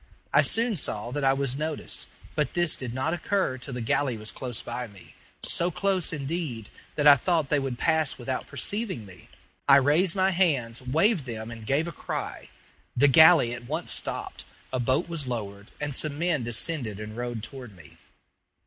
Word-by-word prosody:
I - - +7
soon 230 -2 +3
saw 120 -4 -2
that 145 +1 -3
I 135 0 +4
was 135 -2 -2
noticed, 155 +1 -5 0.3
but 150 -4 -1
this 175 -2 +1
did 125 -3 -6
not 130 +7 -1
occur 175 -6 -1
till 125 0 -7
the 125 - -3
galley 120 +2 0
was 110 0 -5
close 125 -4 -5
by 120 +1 -5
me 100 -4 -16 0.3
so 170 - +2
close, 185 0 0
indeed, 140 -7 -4 0.3
that 150 - 0
I 145 -1 +10
thought 160 0 0
they 150 - +3
would 135 -3 -3
pass 160 -1 +1
without 130 +1 -4
perceiving 190 - -2
me. 95 -3 -15 0.4
I - - +10
raised 150 +7 +4
my 190 0 +3
hands, 140 -11 +1
waved 160 - +2
them, 115 -2 -6
and 115 -2 -9
gave 150 +5 +1
a - - -4
cry. - - -5 0.5
The 145 +3 +6
galley 160 -4 +7
at 120 0 -7
once 160 +5 -3
stopped, - - -4 0.3
a 130 - 0
boat 130 +8 +1
was 165 -5 -2
lowered, 100 -4 -5
and 150 -1 -3
some 145 +2 0
men 165 -5 +1
descended 120 - -2
and 105 0 -7
rowed 120 -2 -4
toward 125 -3 -9
me. 80 -4 -16
135 Hz, 185 wpm, -27 LUFS, 120-160 Hz, 0.5 s, I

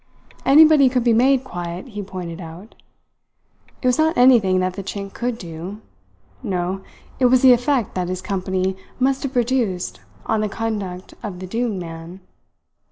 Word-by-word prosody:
Anybody 300 -1 +7
could 250 -1 0
be 235 -1 +3
made 260 +3 +3
quiet, 175 -2 -6
he 210 -2 -6
pointed 185 -3 -7
out. 175 +6 -10 1.1
It - - -4
was 250 +3 +2
not 315 +1 +2
anything 235 -7 +5
that 185 0 0
the 195 - -5
Chink 195 0 -6
could 245 -1 -3
do; 175 +2 -8 0.6
no, 190 -4 -2 0.4
it 260 - +3
was 250 +1 +4
the 255 -1 +9
effect 245 -1 0
that 180 -1 -2
his 185 0 -3
company 190 0 -1 0.2
must 265 +1 +1
have 275 -2 -4
produced 240 -7 -1 0.3
on 220 -1 0
the 215 - -1
conduct 200 -5 -4
of 205 -5 -6
the 185 - -7
doomed 225 +1 -2
man. 165 +1 -8
205 Hz, 165 wpm, -21 LUFS, 185-250 Hz, 1.1 s, the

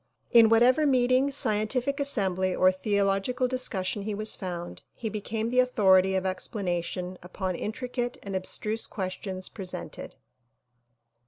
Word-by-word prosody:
In 230 -2 +7
whatever 250 +6 +5
meeting, 255 +1 +3
scientific 250 +2 0
assembly 190 -9 0
or 185 0 +5
theolog 195 +2 0
ical 250 0 0
discussion 220 -6 -1
he 210 +1 -3
was 215 +1 -1
found, 175 -3 -6
he 225 - -4
became 220 +2 -3
the 250 - +3
authority 190 -6 +4
of 190 - 0
explana 185 -2 -2
tion 180 +1 -5
upon 185 +1 -4
intricate 245 +4 -3
and 195 -1 -5
abstruse 210 +4 -1
questions 185 -1 -4
presented. 190 -4 -7
210 Hz, 135 wpm, -27 LUFS, 185-245 Hz, -, In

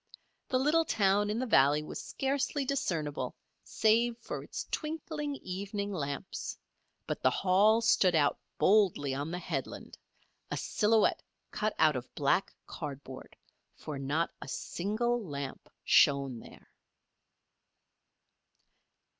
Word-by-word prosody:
The 255 - +2
little 300 +5 +3
town 205 -7 +2
in 210 - -1
the 255 - -1
valley 150 - +4
was - - -6
scarcely 275 +1 -1
discernible 165 - -2 0.3
save 230 +2 +2
for 235 - -6
its - - -6
twinkling 305 -2 -3
evening 200 +2 -4
lamps; 145 +1 -4 0.5
but - - -4
the - - +5
Hall 205 +4 +4
stood 190 -6 +4
out 145 -2 +2 0.2
boldly 185 -9 +3
on 145 +3 -3
the 175 - -3
headland 180 - -5 0.5
a - - -2
silhouette 220 0 +2 0.3
cut 215 0 -1
out 155 -2 +4
of 125 -1 -5
black 145 +7 +1
cardboard, 140 -4 -8 0.4
for 150 -3 -6
not 150 +5 0
a - - -7
single 230 +6 -1
lamp 140 -6 -6
shone 140 -4 +4
there. - - -15
195 Hz, 120 wpm, -31 LUFS, 145-230 Hz, 0.5 s, the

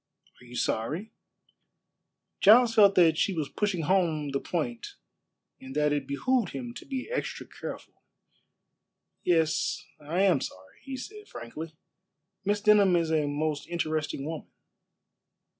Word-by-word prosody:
"Are - - -15
you 120 0 -11
sorry?" 155 - -2 1.3
Giles 230 +3 +7
felt 205 -3 +6
that 165 -3 +5
she 195 - +1
was 155 -4 -2
pushing 195 -5 -1
home 160 -4 +1
the 140 - 0
point 125 -10 -4 0.6
and 130 +1 -10
that 150 0 +2
it 145 -2 -2
behooved 230 - 0
him 125 -3 -5
to - - -12
be 265 -2 -4
extra - - -3
careful. - - -9 1.2
"Yes, 165 -3 +1
I 155 +5 -1
am 180 -9 +4
sorry," 95 0 -8
he 270 -1 -6
said 420 +10 -9
frankly. 155 +7 -8 0.7
"Miss 205 +1 0
Denham 205 -3 +5
is 165 -2 +1
a 155 -2 +2
most 145 0 -2
interesting 155 -4 -2
woman." 160 0 -5
160 Hz, 135 wpm, -28 LUFS, 145-200 Hz, 1.3 s, Giles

